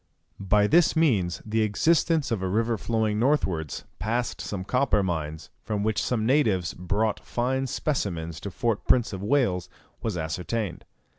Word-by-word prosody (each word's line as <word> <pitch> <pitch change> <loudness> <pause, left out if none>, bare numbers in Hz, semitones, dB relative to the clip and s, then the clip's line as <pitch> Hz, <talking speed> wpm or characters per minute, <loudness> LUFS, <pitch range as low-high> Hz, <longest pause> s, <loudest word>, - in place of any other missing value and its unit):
By 105 +2 +5
this 165 +10 +4
means 110 - +2
the 110 +1 0
existence 155 +6 +2
of 110 -5 0
a 95 - -1
river 115 +4 +1
flowing 110 -1 0
northwards, 95 - 0 0.2
past 120 +2 -1
some 95 -3 -4
copper 125 -1 +2
mines, 80 -4 -3
from 105 -2 -2
which 110 -1 +1
some 115 -3 0
natives 110 - +2
brought 100 +5 -1
fine 130 +2 -1
specimens 85 - -2
to 100 - -5
Fort 110 +3 -2
Prince 120 -4 +3
of 95 - -5
Wales, 100 -6 +1 0.3
was 110 -6 -2
ascertained. 90 +4 -3
110 Hz, 150 wpm, -26 LUFS, 90-125 Hz, 0.3 s, By